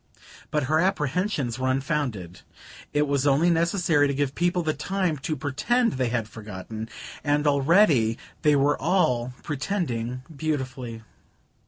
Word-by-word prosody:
But 150 Hz, -2 st, 0 dB
her 155 Hz, +4 st, +2 dB
apprehensions 160 Hz, -, 0 dB
were 130 Hz, 0 st, 0 dB
unfounded. 130 Hz, -, -2 dB, 0.5 s
It 150 Hz, 0 st, +1 dB
was 140 Hz, 0 st, +1 dB
only 150 Hz, +5 st, +4 dB
necessary 170 Hz, -3 st, +2 dB
to 140 Hz, -, -1 dB
give 140 Hz, -1 st, 0 dB
people 175 Hz, +2 st, +1 dB
the 155 Hz, -1 st, 0 dB
time 180 Hz, +2 st, -1 dB
to 155 Hz, +3 st, -2 dB
pretend 185 Hz, -, +1 dB
they 130 Hz, -2 st, 0 dB
had 115 Hz, -3 st, -1 dB
forgotten; 110 Hz, +1 st, -7 dB, 0.3 s
and 145 Hz, 0 st, +1 dB
already 140 Hz, -, +4 dB, 0.2 s
they 150 Hz, -2 st, +4 dB
were 145 Hz, +1 st, +2 dB
all 130 Hz, -9 st, +2 dB
pretending 130 Hz, -, -2 dB
beautifully. 130 Hz, -6 st, -3 dB
145 Hz, 135 wpm, -25 LUFS, 125-165 Hz, 0.5 s, only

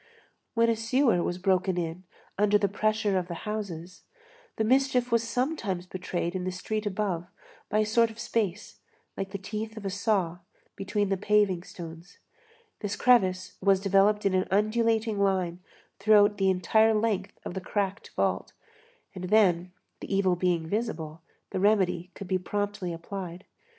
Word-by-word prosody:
When 230 Hz, 0 st, +4 dB
a 230 Hz, -, +3 dB
sewer 230 Hz, -3 st, +2 dB
was 175 Hz, -, -2 dB
broken 185 Hz, 0 st, +1 dB
in 170 Hz, +2 st, -3 dB, 0.3 s
under 210 Hz, +1 st, +4 dB
the 205 Hz, -, +1 dB
pressure 215 Hz, -1 st, +1 dB
of 175 Hz, -, -5 dB
the 175 Hz, -, -5 dB
houses, 185 Hz, -5 st, -5 dB, 0.5 s
the 220 Hz, -, 0 dB
mischief 250 Hz, 0 st, +2 dB
was 230 Hz, -1 st, +4 dB
sometimes 230 Hz, -, -2 dB
betrayed 180 Hz, -2 st, -3 dB
in 185 Hz, -, -2 dB
the 185 Hz, -, -2 dB
street 215 Hz, +4 st, -3 dB
above 190 Hz, -4 st, -2 dB, 0.4 s
by 215 Hz, -, +1 dB
a -, -, +1 dB
sort 230 Hz, +2 st, +3 dB
of 225 Hz, -, -12 dB
space, 215 Hz, -4 st, -2 dB, 0.4 s
like 195 Hz, -, -4 dB
the 200 Hz, -, -4 dB
teeth 215 Hz, +3 st, -5 dB
of 210 Hz, -, -7 dB
a 195 Hz, -, -1 dB
saw, 190 Hz, -4 st, 0 dB, 0.4 s
between 200 Hz, +1 st, -1 dB
the 195 Hz, -, +1 dB
paving 205 Hz, -2 st, +2 dB
stones; 170 Hz, -1 st, -10 dB, 0.6 s
this 205 Hz, 0 st, -3 dB
crevice 185 Hz, -7 st, +3 dB
was 195 Hz, 0 st, +4 dB
developed 200 Hz, +2 st, +3 dB
in 195 Hz, -, +3 dB
an 185 Hz, 0 st, +1 dB
undulating 220 Hz, +1 st, +1 dB
line 185 Hz, -3 st, +1 dB, 0.4 s
throughout 205 Hz, -1 st, +5 dB
the 195 Hz, 0 st, +3 dB
entire 220 Hz, +5 st, +3 dB
length 210 Hz, -3 st, -1 dB
of -, -, -4 dB
the 190 Hz, -, -4 dB
cracked 200 Hz, +2 st, -2 dB
vault, -, -, 0 dB, 0.6 s
and 185 Hz, -2 st, -6 dB
then, 180 Hz, -3 st, +3 dB, 0.3 s
the -, -, -8 dB
evil 195 Hz, -2 st, +3 dB
being 175 Hz, -2 st, 0 dB
visible, 165 Hz, -6 st, -3 dB, 0.3 s
the -, -, -2 dB
remedy 190 Hz, -3 st, +2 dB
could 200 Hz, -, -8 dB
be 185 Hz, 0 st, +1 dB
promptly 205 Hz, -1 st, -3 dB
applied. 175 Hz, +1 st, -7 dB
195 Hz, 160 wpm, -28 LUFS, 185-215 Hz, 0.6 s, throughout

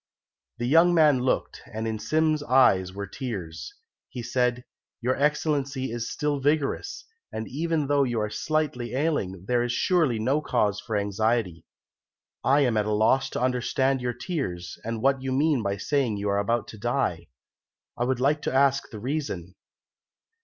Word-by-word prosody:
The 120 Hz, -, -2 dB
young 165 Hz, +6 st, +5 dB
man 150 Hz, -5 st, +5 dB
looked, 125 Hz, +1 st, -1 dB
and 110 Hz, +1 st, -3 dB
in 110 Hz, -1 st, -3 dB
Sim's 155 Hz, +3 st, +1 dB
eyes 125 Hz, -10 st, +4 dB
were 100 Hz, +1 st, -5 dB
tears. 100 Hz, -, -6 dB, 0.3 s
He 125 Hz, -, -6 dB
said, 125 Hz, 0 st, 0 dB, 0.3 s
"Your 125 Hz, +2 st, 0 dB
Excellency 140 Hz, -3 st, 0 dB
is 120 Hz, 0 st, -3 dB
still 150 Hz, -1 st, -1 dB
vigorous, 145 Hz, -, -1 dB, 0.3 s
and 110 Hz, 0 st, -5 dB
even 160 Hz, +2 st, -1 dB
though 140 Hz, 0 st, +3 dB
you 120 Hz, -3 st, -1 dB
are 105 Hz, 0 st, -2 dB
slightly 130 Hz, -4 st, -2 dB
ailing, 100 Hz, -, -1 dB
there 120 Hz, -1 st, +2 dB
is 120 Hz, 0 st, -1 dB
surely 155 Hz, -4 st, +2 dB
no 130 Hz, +7 st, +1 dB
cause 105 Hz, -8 st, 0 dB
for 110 Hz, 0 st, -3 dB
anxiety. 100 Hz, -3 st, -1 dB, 0.8 s
I 140 Hz, +2 st, +4 dB
am 120 Hz, -5 st, +2 dB
at 105 Hz, 0 st, +1 dB
a -, -, 0 dB
loss 130 Hz, +6 st, +3 dB
to -, -, -4 dB
understand 130 Hz, +1 st, +1 dB
your 125 Hz, 0 st, -1 dB
tears, 115 Hz, -, -4 dB
and 115 Hz, 0 st, -4 dB
what 135 Hz, 0 st, +3 dB
you 130 Hz, 0 st, -3 dB
mean 145 Hz, 0 st, +2 dB
by 100 Hz, -1 st, -2 dB
saying 130 Hz, 0 st, 0 dB
that -, -, -5 dB
you 100 Hz, -, -1 dB
are 100 Hz, 0 st, +1 dB
about 115 Hz, +3 st, 0 dB
to 110 Hz, -, -10 dB
die. 120 Hz, -8 st, -1 dB, 0.7 s
I 120 Hz, -, -1 dB
would 130 Hz, -1 st, 0 dB
like 145 Hz, +3 st, +2 dB
to -, -, -2 dB
ask 135 Hz, 0 st, +2 dB
the 110 Hz, -, -8 dB
reason." 120 Hz, -, -4 dB
125 Hz, 175 wpm, -26 LUFS, 110-140 Hz, 0.8 s, young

